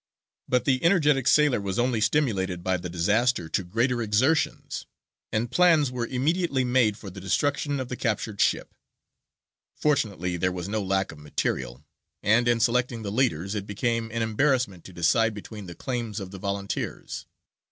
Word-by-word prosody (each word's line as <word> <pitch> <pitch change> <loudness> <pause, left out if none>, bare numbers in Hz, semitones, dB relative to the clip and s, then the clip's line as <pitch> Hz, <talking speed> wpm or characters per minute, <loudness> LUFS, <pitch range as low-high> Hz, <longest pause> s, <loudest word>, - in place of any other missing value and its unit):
But 125 -1 +1
the 130 0 +2
energetic 150 -7 +3
sailor 150 -7 +4
was 95 -1 -3
only 120 -2 +1
stimulated 100 -9 +1
by 95 0 +1
the 90 0 -6
disaster 105 +4 +1
to 95 - 0
greater 120 +7 0
exertions, 125 +9 0 0.4
and 115 +3 -1
plans 160 -4 +4
were 120 -2 -3
immediately 140 +2 0
made 125 -4 +2
for 100 -4 -9
the 95 +1 -9
destruction 140 - 0
of 130 - -3
the 125 - -4
captured 110 -3 -2
ship. - - +1 1.0
Fortunately 100 - 0
there 90 +2 +1
was 90 -1 -5
no 110 +1 -1
lack 95 0 0
of 80 - -13
material, 65 -3 -3 0.4
and, 115 +4 +4
in 120 -1 +3
selecting 120 0 +1
the 100 - -3
leaders, 100 -6 0
it 100 -1 -4
became 115 +2 -1
an 115 0 -1
embarrassment 115 - +1
to - - -10
decide 105 +6 +2
between 105 -1 -9
the 85 - -8
claims 120 -4 -3
of 95 -2 -7
the 95 - -8
volunteers. 100 0 -4
110 Hz, 165 wpm, -26 LUFS, 95-130 Hz, 1.0 s, sailor